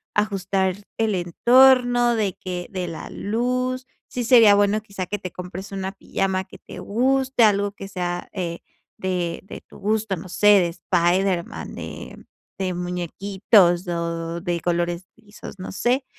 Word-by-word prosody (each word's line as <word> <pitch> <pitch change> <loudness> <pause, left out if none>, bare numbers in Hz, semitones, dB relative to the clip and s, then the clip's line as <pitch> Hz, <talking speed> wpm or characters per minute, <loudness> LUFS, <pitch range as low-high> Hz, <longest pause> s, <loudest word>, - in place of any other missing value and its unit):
ajustar 195 -2 0 0.2
el 220 -3 +1
entorno 245 +6 +4
de 205 -5 0
que 180 -1 -5
de 185 -2 -3
la 165 - -7
luz. 255 +4 -2 0.2
Sí 245 - -4
sería 230 -4 +7
bueno, 205 +1 +2
quizá, 200 -3 -6
que 205 - -3
te 185 -3 -6
compres 180 +2 -8
una 190 -1 -3
pijama 190 -1 -2
que - - -14
te - - -11
guste, 260 +3 +1
algo 205 -1 +3
que 195 -1 -9
sea, 175 -2 -4
eh, 170 -3 -4 0.4
de 180 -2 -2
de 195 - -10
tu - - -17
gusto, 215 0 0
no 175 +3 -9
sé, 205 +3 +1
de 170 -2 +1
Spiderman, 175 +1 0
de - - -9 0.3
de 185 -1 -1
muñequitos 180 +1 +2
o 170 0 -3
de 175 -2 -2
colores 175 0 -1
lisos, 210 -3 -12
no 185 - -6
sé. 245 +7 0
195 Hz, 150 wpm, -23 LUFS, 175-220 Hz, 0.4 s, sería